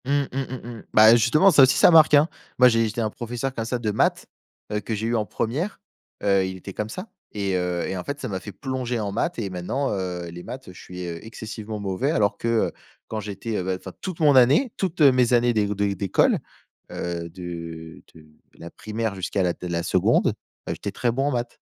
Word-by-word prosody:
Mmh, 135 - -2 0.2
mmh, 135 - -3
mmh 125 -2 -7
mh. - - -14
Bah, 110 +2 +8
justement, 150 - +5
ça 145 - +6
aussi, 130 0 +4
ça - - +7
marque, 160 -2 +7
hein. 145 +2 +5 0.3
Moi, 125 0 +7
j'ai 115 -1 +2
été 110 +2 -3
un 110 - 0
professeur, 120 +4 -4
comme 115 -3 -3
ça 125 +2 -1
de 110 -3 -2
maths, 105 - +1 0.5
heu, 105 - 0
que 110 +1 -4
j'ai 110 +1 -3
eu 120 - 0
en 110 -2 0
1re, 150 - -3 0.4
heu, 100 -1 +3
il 95 0 -5
était 95 +2 -9
comme 105 +2 -4
ça 185 - -7 0.3
et 100 -2 -1
heu 90 -1 -1
et 95 - -3
en 90 - -4
fait, 140 0 -5
ça 130 - -4
m'a 95 -4 -4
fait 100 - -8
plonger 125 +1 -3
en 100 -2 -3
maths 170 +7 -1
et 100 -4 -2
maintenant, 95 +10 -2
heu, 90 -3 -3
les 85 +1 -9
maths, 130 +1 -8
heu, 90 - -10
je - - -13
suis, 90 0 -7
heu, 85 -1 -6
excessivement 110 -1 -7
mauvais, 100 +8 -1
alors 100 -7 +1
que, - - -4
heu, 115 -1 +2 0.4
quand 110 - -4
j'étais, 105 +2 -5
heu, - - -2
bah, 95 0 -1
enfin, 95 - -9
toute 185 -3 -5
mon 150 -3 +5
année 135 - +5
toutes 180 -4 -2
mes 130 -4 +5
années 120 0 +4
dé 105 -2 +2
de 100 0 0
d'école, 100 -1 +2 0.5
heu, 85 -1 -4
de 85 -2 -8
de 80 -1 -15 0.3
la 85 - -10
primaire 110 -1 -4
jusqu'à 95 +1 -1
la 90 -1 +1
de 90 - -8
la 85 -1 -2
2nde, - - +2 0.3
bah, - - -2
j'étais 100 - -5
très 120 +4 0
bon 135 +4 -1
en - - +1
maths. 120 -2 -3
110 Hz, 240 wpm, -24 LUFS, 95-125 Hz, 0.5 s, Bah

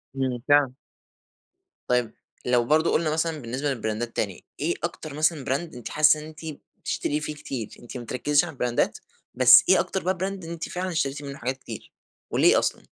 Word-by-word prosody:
إمم، 130 -2 -1
فعلًا. 145 -3 +4 1.1
طيب 125 -2 +1 0.3
لو 125 -1 +3
برضو 155 +4 +3
قلنا 160 -1 +2
مثلًا 160 0 0
بالنسبة 130 +5 -2
للبراندات 115 -1 -3
تاني 100 -4 -2 0.2
إيه 165 +4 +1
أكتر 160 -3 -4
مثلًا 155 -1 +1
براند 140 +4 -2
أنتِ 120 - -7
حاسة 155 0 +5
إن 150 - -8
أنتِ 155 -1 -12 0.4
بتشتري 150 - -2
فيه 150 0 -4
كتير؟ 130 -6 -5
أنتِ 120 +2 -9
ما 120 - -6
بتركّزيش 145 +6 +2
علي 170 - -6
البراندات، 125 -2 0 0.4
بس - - +9
ايه - - +7
أكتر - - -2
بقى 185 +1 0
براند 190 0 -3
أنتِ 170 0 -5
فعلًا 185 +1 -3
اشتريتِ 145 -4 -1
منه 140 -1 -7
حاجات 130 +2 -3
كتير - - -9 0.4
وليه - - +5
أصلًا؟ - - -2
145 Hz, 180 wpm, -25 LUFS, 125-160 Hz, 1.1 s, بس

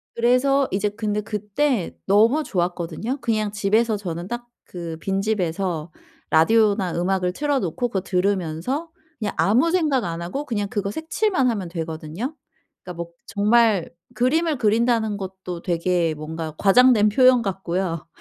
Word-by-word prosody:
그래서 255 +3 +3
이제 205 +2 0
근데 210 0 -2
그때 210 - -1
너무 225 +10 +4
좋았거든요. 180 - -2
그냥 215 -3 0
집에서 215 +2 +1
저는 175 -3 -5
딱 240 +2 -5 0.2
그 170 -2 -7
빈집에서 190 -4 -1 0.4
라디오나 200 +1 +3
음악을 180 +1 0
틀어 290 +4 0
놓고 205 +6 -2
그거 200 - -1
들으면서 190 - -1 0.3
그냥 210 -3 -2
아무 245 +11 +3
생각 305 - +1
안 165 0 -4
하고 270 +13 -4
그냥 205 -5 -2
그거 200 -1 -2
색칠만 320 - 0
하면 205 -6 -2
되거든요. 165 - -5 0.5
그러니까 175 -2 -5
막 170 - -15 0.2
정말 210 -2 +3 0.3
그림을 305 +5 +1
그린다는 225 -1 +1
것도 190 -3 -7
되게 170 -2 0
뭔가 155 +1 -6
과장된 215 +1 +5
표현 255 +2 +5
같고요. 185 -4 -3
205 Hz, 315 characters per minute, -23 LUFS, 180-240 Hz, 0.5 s, 과장된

